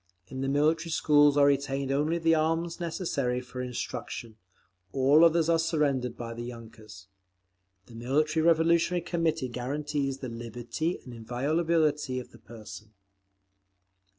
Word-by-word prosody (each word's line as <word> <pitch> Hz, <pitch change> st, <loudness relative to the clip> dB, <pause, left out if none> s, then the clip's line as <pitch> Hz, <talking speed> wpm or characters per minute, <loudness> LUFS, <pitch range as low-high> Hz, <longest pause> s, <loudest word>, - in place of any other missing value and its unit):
In 130 Hz, -, -6 dB
the 135 Hz, -, -1 dB
Military 155 Hz, +4 st, +1 dB
Schools 145 Hz, -2 st, +4 dB
are 145 Hz, -, +6 dB
retained 140 Hz, -1 st, 0 dB
only 150 Hz, +4 st, +1 dB
the 165 Hz, -1 st, +3 dB
arms 165 Hz, +2 st, 0 dB
necessary 160 Hz, -8 st, -2 dB
for 125 Hz, 0 st, -7 dB
instruction; 120 Hz, -2 st, -5 dB, 0.6 s
all 140 Hz, +4 st, +5 dB
others 165 Hz, -1 st, +4 dB
are 165 Hz, -1 st, +3 dB
surrendered 145 Hz, -7 st, 0 dB
by 115 Hz, -1 st, -6 dB
the 115 Hz, -, -7 dB
yunkers. 110 Hz, -5 st, -10 dB, 0.8 s
The 115 Hz, -, -16 dB
Military 150 Hz, +7 st, 0 dB
Revolutionary 170 Hz, +1 st, +3 dB
Committee 165 Hz, -6 st, -1 dB
guarantees 135 Hz, +2 st, -3 dB
the 135 Hz, -, -6 dB
liberty 120 Hz, +7 st, -4 dB
and 125 Hz, -, -9 dB
inviolability 145 Hz, +4 st, 0 dB
of 125 Hz, -, -10 dB
the -, -, -16 dB
person. 110 Hz, -1 st, -12 dB
140 Hz, 130 wpm, -28 LUFS, 125-160 Hz, 0.8 s, are